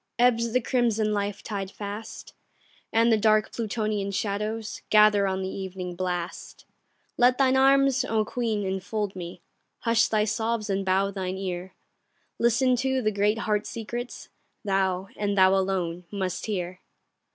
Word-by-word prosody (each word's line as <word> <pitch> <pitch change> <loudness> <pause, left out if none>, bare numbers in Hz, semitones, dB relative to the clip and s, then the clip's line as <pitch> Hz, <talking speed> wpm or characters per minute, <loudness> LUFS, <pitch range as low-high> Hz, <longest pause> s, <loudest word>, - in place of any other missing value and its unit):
Ebbs 235 -1 +3
the 255 +2 +2
crimson 225 -4 +1
life 205 -1 -2
tide 195 -3 -4
fast, 205 +2 -8 0.6
And 230 +1 +4
the 220 - +4
dark 215 0 +3
Plutonian 215 -3 -2
shadows 210 +2 -3
Gather 210 -2 +5
on 190 0 -1
the - - -2
evening 185 -2 -5
blast; 180 -1 -4 0.5
Let 250 +1 +4
thine 265 -1 +3
arms, 270 -1 +4
O 220 -1 +1
Queen, 220 -3 -2
enfold 195 +2 -3
me, 175 -1 -8 0.4
Hush 230 -1 +3
thy 215 -1 +2
sobs 220 0 -1
and 195 0 0
bow 190 +1 +1
thine 190 -1 -4
ear; 185 -1 -5 0.6
Listen 245 +2 +3
to 265 0 0
the 215 - +2
great 205 +2 +1
heart 210 -2 -1
secrets, 240 +2 -6 0.4
Thou, 190 -1 0
and 205 -1 -1
thou 190 0 +6
alone, 185 -3 -1
must 190 -2 -3
hear. 185 -3 -3
210 Hz, 145 wpm, -26 LUFS, 190-225 Hz, 0.6 s, thou